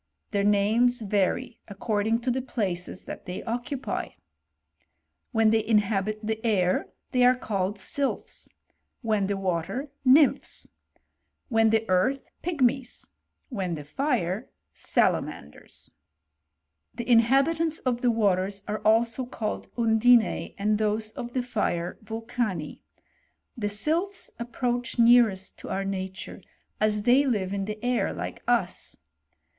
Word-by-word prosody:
Their 200 -1 +1
names 220 +5 +3
vary 210 +4 0
according 215 +2 -1
to 250 +1 0
the 260 +2 -1
places 185 -8 -3
that - - -9
they 180 - -5
occupy. 245 +3 -3 1.2
When 225 -2 +4
they 220 -1 +3
inhabit 210 -1 +1
the 220 0 -3
air, 185 -6 +1 0.2
they 250 -1 +3
are 250 +1 +6
called 200 -4 -2
sylphs; 275 +8 -3 0.5
when 215 -3 +1
the 200 0 -1
water, 195 - -2
nymphs; 275 +2 +3 0.8
when 225 -2 +4
the 225 0 +2
earA!/ 185 +9 +3 0.3
pigmies; 265 -7 0 0.4
when 190 -9 -2
the 150 - -7
fire, 220 - -1 0.2
salamanders, 75 +2 -2
f - - -38 1.0
The 235 - -3
inha^ 240 +3 +5
bitants 325 0 -1
of 245 -2 0
the 245 - +3
waters 200 -3 +1
are 210 +1 -2
also 230 +4 +2
called 215 -4 -4
undinte, 230 0 +3
and 210 +1 +1
thomi 215 0 0
of 240 +1 -7
the 255 - +1
fire 180 -7 -2
vulcanu 225 -6 -3 0.8
The 210 -5 -2
sylphs 325 - -1
approach 245 0 -2
nearest 230 -5 +4
ttf, - - -9
our 195 0 -2
nature, 190 -1 -5 0.4
as 210 -1 +2
they 250 +5 +5
live 200 -6 0
in 195 -1 -2
the 210 +1 -4
air 245 -1 +1
like - - -6
us. - - 0
220 Hz, 130 wpm, -26 LUFS, 200-245 Hz, 1.2 s, are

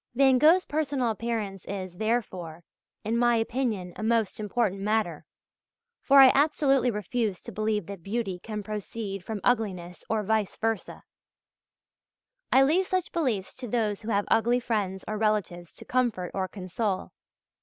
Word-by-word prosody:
Van 265 0 +5
Gogh's 335 +6 +5
personal 285 -5 0
appearance 215 -4 -3
is, 185 -3 -6
therefore, 185 -8 -2 0.4
in 220 +2 -1
my 240 0 +3
opinion 225 -6 -1
a - - -6
most 225 -2 +1
important 210 -2 -1
matter, 205 -7 -1 0.8
for 275 0 +6
I 265 - +9
absolutely 275 -3 +3
refuse 210 -1 -2
to 235 - -8
believe 215 -2 -1
that 195 -1 -8
beauty 195 -2 -3
can 210 +2 -6
proceed 210 -1 -5
from 215 +1 -4
ugliness 185 -8 -1
or 220 -1 0
vice 215 -1 0
versâ. 225 -3 -3 1.5
I 265 - +6
leave 345 +7 +2
such 370 -2 -1
beliefs 245 - -1
to 255 -1 -8
those 215 -3 -1
who 220 - -6
have 205 -2 +1
ugly 240 +2 +3
friends 205 -6 -2
or 215 0 -3
relatives 205 -6 -1
to - - -12
comfort 235 -8 0
or 190 -1 -1
console. 190 +1 -3
220 Hz, 150 wpm, -27 LUFS, 195-245 Hz, 1.5 s, I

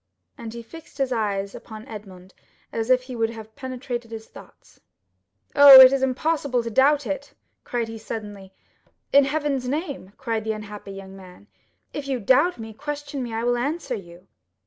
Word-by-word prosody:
And 225 -1 -8
he 235 0 -8
fixed 325 +8 -13
his 270 -2 0
eyes 200 -4 -1
upon 220 -1 -10
Edmond 190 -4 -11 0.4
as 225 +1 -2
if 255 0 +4
he 255 -1 -8
would 225 -1 0
have 220 -1 -10
penetrated 250 -2 -5
his 225 -1 -8
thoughts. - - -17 0.8
"Oh, 280 -2 +11
it 260 0 +10
is 275 - +1
impossible 265 -1 0
to 230 - -5
doubt 280 +4 +3
it," 230 +8 -5 0.3
cried 235 -2 -2
he, 225 0 -8
suddenly. 205 -3 -7 0.6
"In 280 0 +7
heaven's 275 -3 -1
name!" 280 - -4
cried 225 -3 -2
the 220 0 -1
unhappy 210 -1 -8
young 195 0 -10
man, 185 +1 -14 0.5
"if 290 -2 -5
you 265 -2 -1
doubt 265 - +3
me, 225 -1 -8
question 290 +2 -5
me; 240 -2 -5
I 225 +1 -3
will 245 0 +1
answer 285 +2 -2
you." 180 -4 -9
235 Hz, 175 wpm, -24 LUFS, 215-275 Hz, 0.8 s, Oh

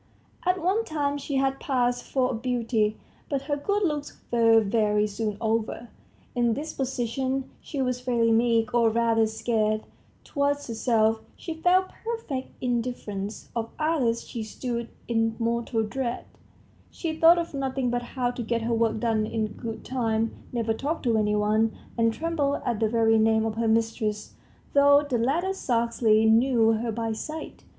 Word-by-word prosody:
At 365 +1 +3
one 380 +6 +1
time 290 -5 -1
she 280 0 -4
had 270 0 +1
passed 245 -3 0
for 260 -1 0
a - - -3
beauty, 230 -3 0 0.3
but 275 -2 -1
her 290 +1 -1
good 405 +8 0
looks 300 -5 -2
were 230 -1 +5
very 210 0 +2
soon 210 0 -3
over. 225 +1 -1 0.4
In 240 -2 +2
disposition, 265 -2 -2
she 275 -3 -3
was 250 -1 -1
very 235 -2 +2
meek, 230 0 +2
or, 235 -1 +4
rather, 225 0 +2
scared; 215 -1 0 0.4
towards 285 0 -1
herself, 225 -1 +1
she 330 - -6
felt 360 +3 +2
perfect 450 - -4
indifference; 230 -5 -3
of 230 -1 -2
others, 285 -8 0
she 235 - -5
stood 235 +1 -4 0.2
in 225 -1 +1
mortal 230 -1 0
dread; 240 +2 -3 0.6
she 320 -2 -4
thought 330 +2 +7
of 340 -2 -3
nothing 265 -2 -1
but 245 0 0
how 245 0 -2
to 245 - -6
get 230 0 -1
her 230 +1 0
work 225 -1 +1
done 220 -2 +1
in 220 -1 -1
good 225 -1 -7
time, 225 -3 0 0.2
never 230 -2 0
talked 290 +8 -3
to 235 -3 +2
any 210 -1 +2
one, 215 +1 +1 0.2
and 230 -1 +3
trembled 295 +1 -1
at 235 -4 -1
the 220 -1 +2
very 225 -1 +3
name 220 0 +3
of 220 - -1
her 225 +1 -1
mistress, 220 -1 0 0.4
though 285 +1 +6
the 250 -4 0
latter 330 +11 +1
scarcely 230 - +2
knew 225 0 +4
her 225 +1 -1
by 225 0 -2
sight. 310 +8 -6
235 Hz, 160 wpm, -26 LUFS, 225-270 Hz, 0.6 s, thought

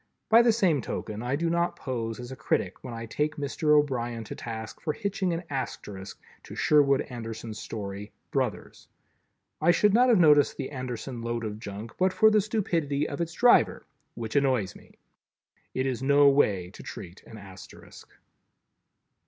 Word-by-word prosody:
By 230 +1 +8
the 235 -1 +4
same 185 - +2
token, 110 -1 -5
I 125 +3 -1
do 165 +3 -1
not 170 +1 0
pose 115 -3 -4
as 120 +1 -8
a - - -6
critic 95 -6 -2
when 125 - -7
I 115 0 -6
take 150 +7 -2
Mr. 150 +1 +2
O'Brien 120 -5 -1
to - - -7
task 110 -1 -7
for 155 - -1
hitching 200 -2 -2
an 170 +1 -3
Asterisk 105 -8 -6 0.2
to - - -11
Sherwood 140 -2 +4
Anderson's 115 -2 -7
story, 100 -1 -6 0.2
"Brothers." - - -3 0.7
I 160 - +3
should 200 +4 +4
not 250 +3 +5
have 235 - +5
noticed 150 -5 +5
the - - -5
Anderson 125 -2 -5
load 115 0 -3
of 105 -1 -5
junk, 105 +2 -7
but 185 0 +2
for 220 +3 +5
the 215 -1 +4
stupidity 165 -9 -1
of 145 - -5
its 170 0 -3
driver, 240 +6 +4 0.3
which 110 -2 -6
annoys 130 -9 +1
me. - - -18 0.8
It 130 - 0
is 130 -3 -2
no 140 +1 +5
way 100 -10 +2
to - - -12
treat 90 +2 -9
an 110 - -11
Asterisk. 95 -2 -13
135 Hz, 170 wpm, -27 LUFS, 115-165 Hz, 0.8 s, By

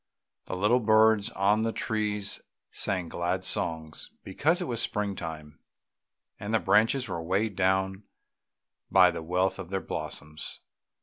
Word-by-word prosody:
The - - -4
little 105 +7 +3
birds 110 -1 +4
on 105 0 +2
the 115 0 0
trees 105 -3 -1 0.3
sang 95 -3 -2
glad 85 +1 -2
songs 80 -1 -2
because 155 - +1
it 180 - -2
was 120 -1 -1
spring 105 -3 -1
time, 75 -3 -7 0.8
and 105 0 -5
the - - +4
branches 115 +6 +3
were 85 -4 -4
weighed 95 +5 0
down 95 +1 +1 0.8
by - - +6
the - - -5
wealth 90 +3 0
of 85 - -7
their 95 0 -1
blossoms. 75 -3 -6
100 Hz, 140 wpm, -28 LUFS, 90-110 Hz, 0.8 s, by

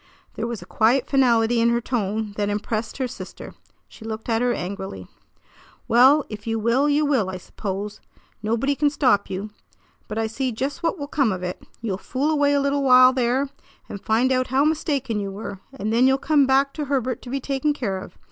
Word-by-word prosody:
There 225 - -3
was 230 -6 -5
a - - -13
quiet 240 +7 +2
finality 240 -4 +3
in 235 - +4
her 235 0 +2
tone 220 -3 -2
that 205 -1 -1
impressed 215 +2 -3
her 260 -2 -1
sister. - - -9 0.3
She - - -15
looked 220 +1 -6
at 225 0 +1
her 245 0 +2
angrily. 190 - -5 0.8
"Well, 265 +5 +5
if 210 0 -9
you 225 0 0
will, 235 +6 +2
you 295 +1 +2
will, 260 -10 +1
I 185 - -4
suppose. 200 +2 -6 0.4
Nobody 230 +6 0
can 290 +1 +2
stop 260 -8 +2
you. 200 +3 -5 0.6
But 215 - -5
I 225 - +1
see 255 +4 -2
just 270 +8 -3
what 335 +2 0
will 285 - -4
come 275 -5 +1
of 185 -1 -4
it. 180 0 -4 0.2
You'll 200 -5 -3
fool 275 +8 -1
away 290 -2 +3
a - - +3
little 280 0 +1
while 255 -1 +7
there, 260 +2 +1 0.4
and 200 - -7
find 235 +4 +2
out 255 0 +1
how 265 +3 +2
mistaken 280 -7 0
you 200 -1 -3
were; 195 0 -7
and 220 -5 -3
then 245 +3 +5
you'll 265 0 +4
come 285 -1 +3
back 275 +1 +3
to 300 - -4
Herbert 260 -3 -1
to 245 - -10
be 275 +2 -2
taken 275 +2 0
care 225 -10 -2
of. - - -11
240 Hz, 210 wpm, -23 LUFS, 215-275 Hz, 0.8 s, while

